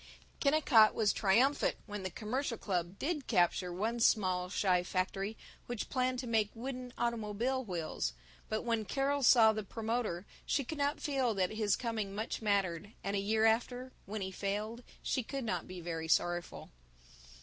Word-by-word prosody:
Kennicott 280 -7 +5
was 215 -2 +3
triumphant 235 +8 +3
when 210 -2 -5
the 185 - -3
Commercial 230 +6 -2
Club 180 -1 -2
did 300 -3 -2
capture 180 -2 +2
one 220 +7 -1
small 185 -6 +3
shy 185 -2 +2
factory 195 +4 -2 0.3
which 240 -3 -4
planned 255 -1 +1
to 250 - -4
make 220 -3 +2
wooden 250 +1 -5
automobile 235 +3 -1
wheels, 165 - -3 0.4
but 215 - -1
when 230 -2 0
Carol 280 +5 0
saw 230 -4 +7
the 215 - -2
promoter 220 -3 -2 0.2
she 280 - 0
could 290 +4 -6
not 285 +1 +1
feel 265 -6 0
that 185 -2 +1
his 215 -2 +1
coming 220 -5 -3
much 220 +3 -3
mattered 200 -2 0
and 200 +1 -1
a - - +1
year 220 +2 +2
after, 245 +3 +1 0.2
when 210 +1 -4
he 190 0 -3
failed, 210 +5 -3 0.2
she 260 - 0
could 270 +3 -5
not 180 -7 -2
be 185 -1 -7
very 165 -1 -4
sorrowful. 175 +1 0
220 Hz, 165 wpm, -33 LUFS, 190-245 Hz, 0.4 s, saw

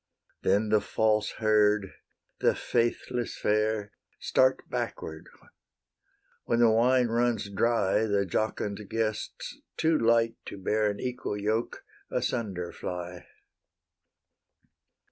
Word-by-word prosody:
Then 105 +3 +2
the 105 -1 +4
false 110 -1 +1
herd, 105 -2 +2 0.5
the - - +3
faithless 120 +1 -1
fair, 105 -1 0 0.3
Start 130 0 +2
backward; 80 0 -5 1.2
when 115 - +1
the 120 -1 +5
wine 125 +3 +4
runs 115 -3 0
dry, 110 0 +2
The 100 -1 +1
jocund 105 +1 -2
guests, 110 -1 -3 0.2
too 160 0 +2
light 115 0 +3
to - - -7
bear 105 +2 +1
An 100 - -4
equal 125 -4 -3
yoke, 110 +3 -1 0.3
asunder 95 -8 -2
fly. 90 0 -6
110 Hz, 105 wpm, -28 LUFS, 100-115 Hz, 1.2 s, the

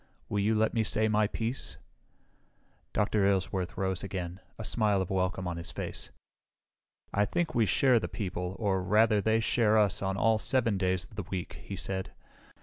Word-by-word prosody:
Will 105 - 0
you 105 +2 +2
let 110 0 +2
me 115 - +2
say 110 0 +1
my 105 -1 +3
piece?" 115 +4 -4 1.1
Dr. 105 0 +1
Aylesworth 95 -2 0
rose 95 -1 -1
again, 90 -2 -4 0.2
a 110 - -6
smile 105 -4 +2
of 95 -1 -2
welcome 95 -1 0
on 85 -1 -3
his 85 0 -5
face. - - -5 1.0
"I 100 - +3
think 160 +9 -1
we 115 -3 +3
share 130 +1 +4
the - - -3
people, 90 -3 -4
or, 100 -4 0
rather, 105 +3 +3
they 110 +2 +2
share 110 -1 +3
us 105 -3 +3
on 95 0 -1
all 110 +1 +3
7 115 -6 +1
days 95 -1 +1
of 105 - -17
the 105 - -2
week," 95 -3 -5
he 100 - -6
said. 95 0 -4
100 Hz, 180 wpm, -30 LUFS, 95-110 Hz, 1.1 s, share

